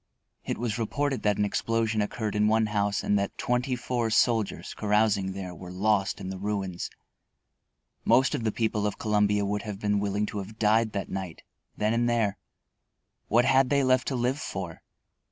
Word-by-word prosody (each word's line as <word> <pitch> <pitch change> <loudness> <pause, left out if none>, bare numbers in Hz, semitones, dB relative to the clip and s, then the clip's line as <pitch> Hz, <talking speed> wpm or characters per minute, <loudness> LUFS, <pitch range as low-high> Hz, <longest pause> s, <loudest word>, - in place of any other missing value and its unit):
It - - -3
was 115 -1 -2
reported 135 +4 -1
that 105 -1 +1
an 105 - +2
explosion 115 +1 0
occurred 105 0 -2
in 105 0 +3
one 110 +1 +3
house 105 -1 0
and 105 - +2
that 100 - -3
twenty 125 +1 0
four 120 -2 -1
soldiers, 110 -1 +1
carousing 105 -2 +1
there, 95 -2 -6
were 90 +1 -10
lost 100 +1 +1
in 95 - -5
the 95 -1 -5
ruins. 100 -3 -3 1.1
Most 130 0 +4
of 140 -6 -2
the 110 - +1
people 105 -2 0
of 105 - -4
Columbia 105 -1 +2
would 105 +1 -1
have 105 -3 -6
been 105 -1 +1
willing 100 +1 0
to 105 0 -4
have 105 +3 -8
died 110 0 +2
that 100 -2 -3
night, 95 -3 -5 0.3
then 105 +1 +1
and 120 +1 +2
there. 115 -4 +1 0.9
What 120 +3 +4
had 135 -1 +4
they 140 -1 +3
left 130 0 +3
to 135 - -1
live 125 +3 0
for? 95 - -5
105 Hz, 185 wpm, -27 LUFS, 100-115 Hz, 1.1 s, Most